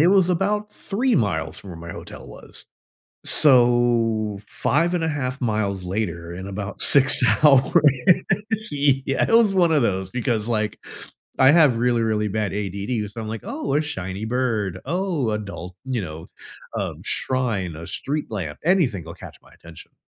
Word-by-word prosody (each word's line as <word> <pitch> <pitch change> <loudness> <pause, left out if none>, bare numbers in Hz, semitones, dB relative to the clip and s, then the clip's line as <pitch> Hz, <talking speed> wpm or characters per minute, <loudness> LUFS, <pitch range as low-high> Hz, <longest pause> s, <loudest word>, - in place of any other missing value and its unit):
it 165 - +5
was 190 -2 +4
about 210 +4 -1
3 235 +5 0
miles 90 -6 -1
from 95 - -12
where 85 - -8
my - - -6
hotel - - -10
was. - - -11 0.6
So, 120 -6 +3
5 170 +5 0
and 175 -2 0
a - - +1
half 140 -2 -3
miles 100 -5 -1
later 85 -4 -3
in 95 +2 -7
about 100 0 -6
6 135 -2 +4 0.2
hours, 135 -3 +5 1.0
yeah, 140 -1 +1
it - - -1
was 220 -4 +5
one 175 -3 +4
of 150 -3 +3
those, 95 -3 -1
because, 120 -3 -1
like, 110 -3 -1 0.6
I 130 +1 +7
have 150 -7 +5
really, 120 0 +1
really 110 -1 0
bad 105 0 -2
ADD 100 +2 -3
so 115 - -7
I'm, 110 - -6
like, 110 0 -6
oh, 280 - -3
a 150 - +3
shiny 100 -9 -5
bird, 110 -6 -1
oh, 175 - -1
adult, 100 -4 -6
you 130 -4 -2
know, 80 -3 -8 0.5
um, - - -4
shrine, 110 -10 -1
a 85 - -8
street 145 +10 -4
lamp, 85 -8 -5
anything 160 - +2
will 85 - -8
catch - - -12
my - - -21
attention. - - -14
115 Hz, 165 wpm, -22 LUFS, 100-145 Hz, 1.0 s, I